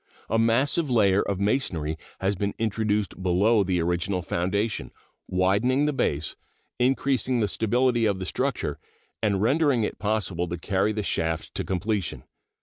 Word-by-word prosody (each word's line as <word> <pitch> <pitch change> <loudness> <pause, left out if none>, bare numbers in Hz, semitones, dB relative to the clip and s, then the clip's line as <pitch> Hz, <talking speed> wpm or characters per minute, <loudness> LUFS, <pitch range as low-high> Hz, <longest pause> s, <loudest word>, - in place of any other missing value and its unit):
A 115 - +3
massive 130 +7 +2
layer 100 -5 +4
of 100 -2 -2
masonry 95 - 0 0.3
has 95 +1 +1
been 100 +2 -2
introduced 105 -3 -1
below 100 +4 +3
the 90 -2 0
original 90 +2 -1
foundation, 100 +6 -1 0.4
widening 100 +10 +2
the 150 - +1
base, 75 - -1 0.4
increasing 130 -1 +1
the 105 - +2
stability 120 +2 +1
of 100 -2 0
the 95 - -5
structure, - - -2 0.4
and 100 -3 +1
rendering 135 -1 +3
it - - -3
possible 100 -5 -1
to 85 +1 -4
carry 95 +4 0
the 105 0 -2
shaft 80 -4 -1
to - - -2
completion. 95 0 -2
105 Hz, 145 wpm, -26 LUFS, 95-115 Hz, 0.4 s, layer